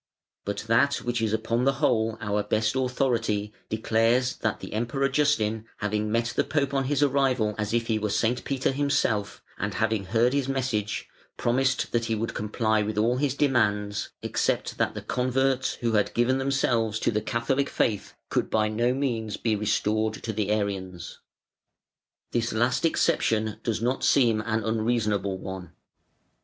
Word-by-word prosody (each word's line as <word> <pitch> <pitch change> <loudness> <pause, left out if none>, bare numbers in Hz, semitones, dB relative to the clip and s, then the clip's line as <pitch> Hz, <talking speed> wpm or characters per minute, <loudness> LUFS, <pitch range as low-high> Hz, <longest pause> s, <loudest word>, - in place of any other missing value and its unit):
But 100 0 -3
that 125 +5 +3
which 120 -1 -1
is 110 -2 0
upon 115 +2 0
the 135 +1 +3
whole 115 -6 +1
our 105 -1 -1
best 110 +3 0
authority 120 -5 0 0.2
declares 115 +3 +1
that 110 -3 -1
"the 95 - -8
Emperor 120 +5 0
Justin 130 -7 +1
having 105 +1 -1
met 115 +1 0
the - - +3
Pope 140 -2 -1
on 135 -1 +1
his 145 +1 +1
arrival 130 -6 +2
as 105 -1 -1
if 115 0 +1
he 110 -2 0
were 105 0 -1
St. 110 +4 0
Peter 135 -1 0
himself, 135 -7 0 0.2
and 100 0 -2
having 110 +1 0
heard 120 +5 +2
his 140 -2 0
message, 120 -6 -2 0.3
promised 130 +2 +1
that 120 -1 0
he 115 -1 0
would 115 +2 -3
comply 110 +1 0
with 105 0 -3
all 115 +4 +2
his 140 0 0
demands 105 -7 +1
except - - -1
that - - +1
the - - -6
converts 130 +1 0
who 120 -1 +1
had 105 -2 +1
given 125 +3 +2
themselves 120 -5 +1
to - - +2
the 105 -1 0
Catholic 125 +5 0
faith 105 -3 -1
could - - 0
by 110 -1 +2
no 120 +4 +1
means 115 -6 -2
be 110 -2 0
restored 110 +1 0
to 110 - -3
the 105 -1 -1
Arians". 95 -4 -3 1.1
This 115 -1 0
last 120 +7 +1
exception 110 -8 +1
does 115 -1 -2
not 125 +2 0
seem 115 -6 +4
an 110 0 -1
unreasonable 110 -3 0
one. 95 -1 -7
115 Hz, 165 wpm, -26 LUFS, 105-130 Hz, 1.1 s, seem